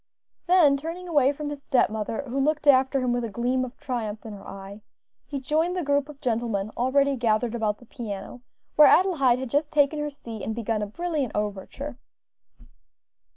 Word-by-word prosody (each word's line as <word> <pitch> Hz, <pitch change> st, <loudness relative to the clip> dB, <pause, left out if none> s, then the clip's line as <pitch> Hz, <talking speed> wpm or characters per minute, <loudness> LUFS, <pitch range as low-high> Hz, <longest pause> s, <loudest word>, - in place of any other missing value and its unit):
Then 335 Hz, -6 st, +5 dB
turning 335 Hz, +5 st, -6 dB
away 285 Hz, -5 st, +3 dB
from 290 Hz, 0 st, -5 dB
his 290 Hz, -1 st, -7 dB
step 260 Hz, -6 st, +2 dB
mother, 220 Hz, +4 st, -3 dB
who 270 Hz, 0 st, -3 dB
looked 300 Hz, +2 st, +1 dB
after 265 Hz, -1 st, +4 dB
him 250 Hz, -1 st, +1 dB
with 245 Hz, 0 st, -1 dB
a 230 Hz, -, -3 dB
gleam 245 Hz, +5 st, 0 dB
of 255 Hz, 0 st, -7 dB
triumph 220 Hz, -5 st, -4 dB
in 220 Hz, -, -7 dB
her 200 Hz, -1 st, -11 dB
eye, 195 Hz, +2 st, -9 dB, 0.5 s
he 280 Hz, -, -4 dB
joined 320 Hz, +7 st, 0 dB
the 360 Hz, -, -1 dB
group 285 Hz, 0 st, +1 dB
of 290 Hz, -2 st, -11 dB
gentlemen 225 Hz, -5 st, -1 dB
already 275 Hz, +3 st, +2 dB
gathered 230 Hz, -1 st, +1 dB
about 215 Hz, -3 st, -1 dB
the 240 Hz, -, -17 dB
piano, 225 Hz, -1 st, -7 dB, 0.4 s
where 300 Hz, -, +9 dB
Adelaide 305 Hz, -10 st, +4 dB
had 260 Hz, -2 st, -5 dB
just 290 Hz, +1 st, +1 dB
taken 295 Hz, 0 st, +3 dB
her 295 Hz, 0 st, -2 dB
seat 235 Hz, -6 st, -9 dB
and 220 Hz, -, -3 dB
begun 225 Hz, -2 st, -1 dB
a 210 Hz, -, -2 dB
brilliant 305 Hz, +1 st, -2 dB
overture. 210 Hz, +7 st, -4 dB
260 Hz, 190 wpm, -25 LUFS, 225-290 Hz, 0.5 s, where